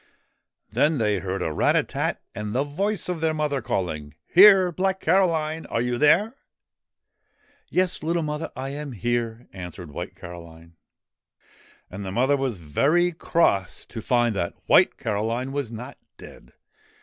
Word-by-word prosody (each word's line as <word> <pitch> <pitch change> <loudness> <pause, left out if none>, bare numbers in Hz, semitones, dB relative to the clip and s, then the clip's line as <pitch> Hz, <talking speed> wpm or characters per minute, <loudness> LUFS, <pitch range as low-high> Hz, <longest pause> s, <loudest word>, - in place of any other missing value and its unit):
Then 150 +1 +2
they 105 -4 +1
heard 95 +1 -3
a 80 - -2
rat - - +2
a - - +3
tat, - - -3
and 105 +2 -5
the 135 - +2
voice 195 +8 -2
of 180 -3 -3
their 160 -1 +1
mother 150 -3 -1
calling: 75 -8 -3
' - - -37
Here! 190 -1 +8
Black 190 +2 -1
Caroline! 165 -3 +1
Are - - -1
you 120 0 -1
there? 200 +10 +4 0.7
' - - -39
'Yes, 185 0 0
little 165 +1 0
mother, 150 +1 -4
I 135 +1 -4
am 145 -1 -6
here,' 120 +1 -2
answered 90 -3 -8
White - - -6
Caroline. 85 -1 -11 1.2
And 95 +2 -6
the 95 - -5
mother 130 +7 +2
was 130 -9 -3
very 155 - +2
cross 155 - 0
to 115 - -6
find 120 -1 +1
that 85 -2 -2
White - - +5
Caroline 115 +5 -2
was 140 -4 -3
not 125 +4 -8 0.2
dead. - - -14
130 Hz, 160 wpm, -24 LUFS, 100-160 Hz, 1.2 s, Here